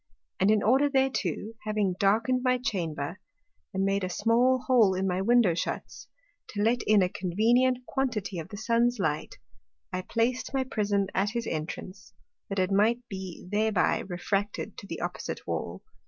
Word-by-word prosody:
And 190 - +3
in 215 -1 +3
order 265 +6 +4
thereto, 265 -5 0
having 210 -3 0
darken'd 230 +6 +2
my 255 -1 +3
Chamber, 170 - -3 0.5
and 190 0 -1
made 195 0 +1
a 185 - -1
small 235 +7 +3
hole 225 -8 +4
in 190 +1 -1
my 185 0 0
Window 230 -3 +4
shuts, 165 - -4 0.4
to 205 -1 -2
let 235 +2 +2
in 210 -2 +5
a - - +3
convenient 240 +8 +1
quantity 230 -10 -2
of 165 +2 -7
the 205 - -8
Sun's 235 +3 +2
Light, 155 -6 -2 0.6
I 185 - -1
plac'd 240 +7 -1
my 265 - +2
Prism 205 -5 0
at 195 +2 +1
his 235 +1 -3
entrance, 165 +4 -6 0.4
that 195 - -3
it 185 0 +1
might 230 +5 +2
be 190 -3 -7
thereby 215 -1 +2
refracted 195 +3 -3
to - - -11
the - - -6
opposite - - -4
Wall. - - -4
210 Hz, 165 wpm, -28 LUFS, 190-240 Hz, 0.6 s, in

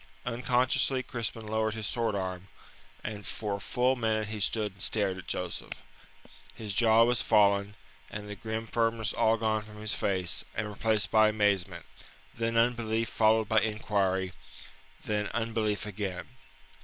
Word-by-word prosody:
Unconsciously 125 +2 +1
Crispin 115 -2 -4
lowered 110 0 0
his 110 -1 -4
sword 115 -1 -1
arm, 95 -1 -4 0.6
and 105 -1 -5
for 105 -1 -3
a - - -11
full 125 +5 +1
minute 110 -3 0
he 110 -1 -4
stood 105 +1 0
and 95 -1 -11
stared 100 -2 +2
at 95 - -10
Joseph. 90 -1 -3 0.8
His 105 -3 -5
jaw 115 +2 +5
was 120 0 +2
fallen 100 -1 +3 0.3
and 105 0 -6
the 105 - -6
grim 110 +2 -4
firmness 115 -1 0
all 110 +1 +3
gone 110 -1 +1
from 105 0 -12
his 105 -1 -2
face, 95 -3 -1
and 110 -1 -1
replaced 105 +1 0
by 110 -1 +6
amazement, 105 -4 0 0.5
then 115 -1 -1
unbelief 115 -1 +1
followed 110 0 +3
by 110 0 +4
inquiry; 100 -4 0 0.7
then 105 -1 0
unbelief 110 -3 -1
again. 95 -3 -4
110 Hz, 150 wpm, -30 LUFS, 105-115 Hz, 0.8 s, by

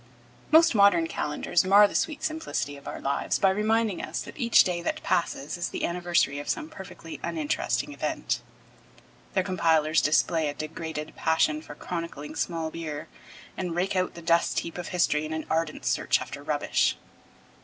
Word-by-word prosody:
Most 325 0 +7
modern 200 -6 +5
calendars 155 +1 0
mar 200 +2 +7
the - - -10
sweet 310 -1 -1
simplicity 315 - -2
of 140 - -13
our - - -5
lives 140 +1 0
by 195 - +4
reminding 215 0 +1
us - - -4
that - - -10
each 235 -5 +5
day 175 -2 -2
that - - -3
passes 170 -4 -1
is 175 - -2
the - - -2
anniversary 175 -4 +1
of 145 - -6
some 315 -1 -2
perfectly 315 - -9
uninteresting 310 -2 -1
event. - - -2 0.9
Their 190 - +2
compilers 165 -4 +2
display 155 +1 +2
a 145 - -5
degraded 155 0 -5
passion 160 -1 +2
for 145 - -10
chronicling 165 -3 -6
small 165 -2 -2
beer, 155 -3 -6 0.5
and 180 -3 -3
rake 185 +3 0
out 185 0 0
the 170 - -9
dust 170 0 +2
heap 170 +1 -7
of 175 - -5
history 160 -4 +1
in 155 +1 -4
an 160 0 -3
ardent 160 -1 -1
search - - +2
after - - -7
rubbish. - - +1
170 Hz, 170 wpm, -27 LUFS, 155-195 Hz, 0.9 s, Most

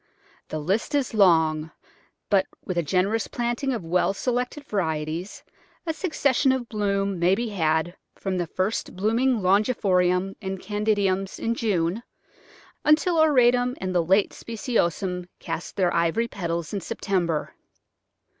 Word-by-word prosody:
The 155 - -4
list 190 - -1
is 275 -5 0
long, 160 -6 +3 0.6
but 195 -1 +4 0.2
with 185 - -3
a 170 - +2
generous 190 +7 0
planting 240 +3 -2
of 230 -7 -3
well 180 +3 +1
selected 250 +5 -2
varieties 165 - -3 0.4
a 325 - -1
succession 285 -6 +1
of 260 -2 -1
bloom 200 -3 -1
may 180 +3 +4
be 235 +2 -2
had 160 -3 0 0.2
from 190 -2 -3
the 175 - -1
first 185 +6 -2
blooming 225 +5 +1
longiflorums 190 -2 +2
and 190 -1 -4
candidums 205 -2 0
in 230 - -1
June 200 -3 0 0.8
until 315 +3 +3
auratum 250 -4 +4
and 185 -1 -3
the 175 -2 +2
late 190 +4 +3
speciosums 190 - -2
cast 165 0 -6
their 180 -3 +1
ivory 170 +8 +1
petals 170 -5 -4
in 200 - -2
September. 175 -4 -2
195 Hz, 135 wpm, -25 LUFS, 175-230 Hz, 0.8 s, but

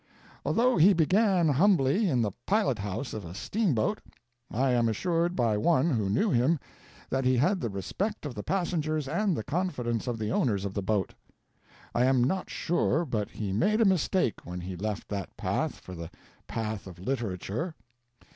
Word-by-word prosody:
Although 245 +2 +2
he 185 +5 +7
began 185 +1 +3
humbly 175 - +3
in 125 -6 +2
the 105 - -1 0.2
pilot 200 - +2
house 100 +7 -4
of 110 - -5
a 85 +1 -8
steamboat, 190 - 0 0.5
I 130 +3 +1
am 120 -2 +3
assured 170 - 0
by 115 - +2
one 160 +7 +3
who 110 -7 0
knew 155 - +2
him 130 +7 +3 0.5
that 135 0 +1
he 130 0 +3
had 180 +8 +2
the 115 - -1
respect 180 - -3
of 145 - -4
the 105 - -5
passengers 155 - -1
and 195 +1 0
the - - -3
confidence 135 - -2
of 120 -2 -1
the 110 0 -2
owners 100 -7 +1
of 100 - -3
the 100 - -2
boat. 100 0 0 0.8
I 120 - +3
am 130 -2 +4
not 185 +9 -1
sure 170 0 0
but 110 -7 -2
he 100 -3 -4
made 205 - +2
a 225 - +5
mistake 185 - +1
when 90 0 -6
he 90 +1 -5
left 105 +3 -4 0.3
path - - -1
for 95 - -11
the 85 -2 -7 0.4
path 110 -3 -4
of 90 - -10
literature. 115 - -3
130 Hz, 175 wpm, -28 LUFS, 105-175 Hz, 0.8 s, he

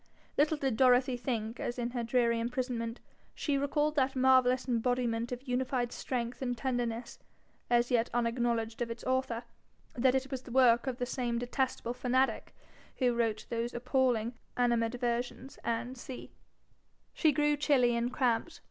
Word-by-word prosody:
Little 300 +2 +3
did 270 -6 -1
Dorothy 255 0 +4
think, 235 -2 -3
as 240 - -3
in 240 0 -2
her 240 -1 -2
dreary 235 -1 +2
imprisonment 240 -1 -2 0.4
she 290 - -1
recalled 295 +2 +1
that 265 -1 +2
marvellous 255 0 +4
embodiment 240 -1 0
of 250 +2 -6
unified 250 -1 0
strength 245 -1 -3
and 245 -2 -2
tenderness, 240 -2 -2 0.5
as 240 0 +3
yet 235 -1 +2
unacknowledged 235 -1 0
of 235 - -1
its 230 0 -6
author, 255 -2 -1 0.5
that 255 +1 +3
it 265 +1 -1
was 265 -2 -3
the - - -13
work 245 -1 +4
of 255 -2 -2
the 250 - -1
same 240 -2 -2
detestable 245 0 -1
fanatic 255 +1 0 0.4
who 250 -2 +2
wrote 225 -2 0
those 235 +1 -2
appalling 250 -2 +1 0.2
'Animadversions, 240 +1 -1 0.4
&c.' 255 0 -9 0.8
She 315 - +3
grew 295 +1 +2
chilly 265 -5 +3
and 235 +1 0
cramped. 250 +6 0
245 Hz, 150 wpm, -31 LUFS, 235-260 Hz, 0.8 s, Dorothy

